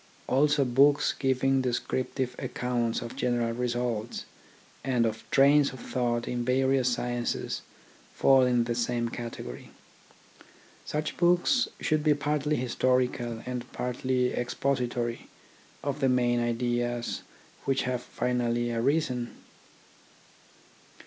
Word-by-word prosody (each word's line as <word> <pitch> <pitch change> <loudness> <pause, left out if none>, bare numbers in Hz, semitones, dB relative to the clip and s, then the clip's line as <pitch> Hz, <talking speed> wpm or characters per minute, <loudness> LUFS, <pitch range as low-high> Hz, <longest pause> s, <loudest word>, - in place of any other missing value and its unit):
Also 145 +1 +3
books 140 +4 +4
giving 135 0 +1
descriptive 125 +1 -2
accounts 120 -2 -1
of 115 - -7
general 120 -2 0
results, 120 -2 -2 0.6
and 120 -4 +1 0.2
trains 140 +1 +5
of 130 - -9
thought 120 -2 -1
in 120 -1 -2
various 130 0 +2
sciences 120 0 -2 0.5
fall 135 -1 +5
in 125 -2 +3
the 120 0 -1
same 120 0 -1
category. 115 - -7 1.2
Such 150 +1 -3
books 175 +9 +3
should 155 -1 +1
be 150 -1 +4
partly 150 +1 0
historical 125 -2 0
and 125 0 -5
partly 125 0 0
expository 120 -2 -1 0.6
of 140 0 -2
the 135 -2 +3
main 120 -1 +2
ideas 120 0 -1 0.4
which 135 0 +1
have 125 -1 -1
finally 120 -1 -1
arisen. 125 0 0
125 Hz, 105 wpm, -28 LUFS, 120-135 Hz, 1.2 s, trains